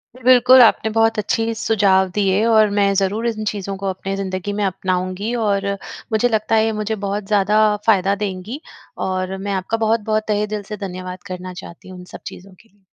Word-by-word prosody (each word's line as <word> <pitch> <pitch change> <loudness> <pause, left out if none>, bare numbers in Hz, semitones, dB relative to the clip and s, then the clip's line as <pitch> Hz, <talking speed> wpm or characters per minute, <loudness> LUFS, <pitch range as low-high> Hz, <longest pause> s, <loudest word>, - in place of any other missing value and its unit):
जी। 255 - -15
बिल्कुल, 255 0 +7
आपने 220 -1 +4
बहुत 225 0 +3
अच्छी 225 +2 -1
सुझाव 195 -4 +2
दिए, 200 0 +2
और 220 -2 +4
मैं 200 -1 +3
ज़रूर 205 +4 0
इन 220 -2 -3
चीज़ों 200 -2 -3
को 195 0 -4
अपने 195 +1 -4
ज़िन्दगी 195 0 -4
में 205 0 -2
अपनाऊँगी, 185 +3 -2
और 200 -3 0 0.4
मुझे 220 +3 +2
लगता 220 0 0
है 220 0 +3
ये 225 - 0
मुझे 220 +1 -2
बहुत 200 +1 -2
ज़्यादा 210 0 +2 0.3
फ़ायदा 195 -2 +3
देंगी। 200 +8 -5 0.5
और 185 0 -2
मैं 200 +1 -4
आपका 190 +4 -2
बहुत-बहुत 220 -1 0
तहे 210 0 0
दिल 205 - -5
से 210 - -4
धन्यवाद 185 0 -8
करना 185 0 -7
चाहती 175 0 -11
हूँ, 185 -1 -10
इन 180 - -11
सब - - -8
चीज़ों 190 +1 -10
के 225 - -28
लिए। 200 -1 -34
205 Hz, 200 wpm, -19 LUFS, 190-220 Hz, 0.5 s, बिल्कुल